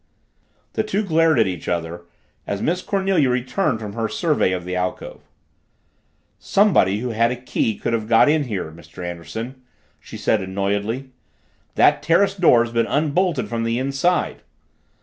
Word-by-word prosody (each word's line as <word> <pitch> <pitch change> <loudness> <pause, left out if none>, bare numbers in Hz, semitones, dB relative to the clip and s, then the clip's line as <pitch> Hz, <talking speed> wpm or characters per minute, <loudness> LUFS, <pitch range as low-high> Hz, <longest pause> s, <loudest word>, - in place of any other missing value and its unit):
The - - 0
two 215 -1 -1
glared 165 -4 +3
at 115 - +4
each 90 -3 -5
other 85 0 -3 0.4
as 100 - -2
Miss 175 - -1
Cornelia 190 -9 +1
returned 125 - 0
from 105 -2 -7
her 115 -1 -2
survey 150 - +1
of 90 -1 -3
the 90 0 -3
alcove. 90 0 -4 1.2
"Somebody 160 - +3
who 125 - -3
had 115 +1 +2
a 125 - -2
key 120 -3 -2
could - - -2
have 110 -2 -1
got 115 +5 +5
in 150 0 +2
here, 100 -9 -4
Mr. 85 +2 -10
Anderson," 110 - -7 0.4
she - - -10
said 110 - +1
annoyedly. 100 +7 -2 0.6
"That - - +4
terrace 170 +6 +3
door's 120 -11 +4
been 115 0 +1
unbolted 155 +1 0
from 115 -1 -3
the 115 +1 0
inside." 135 +7 0
120 Hz, 155 wpm, -21 LUFS, 100-155 Hz, 1.2 s, got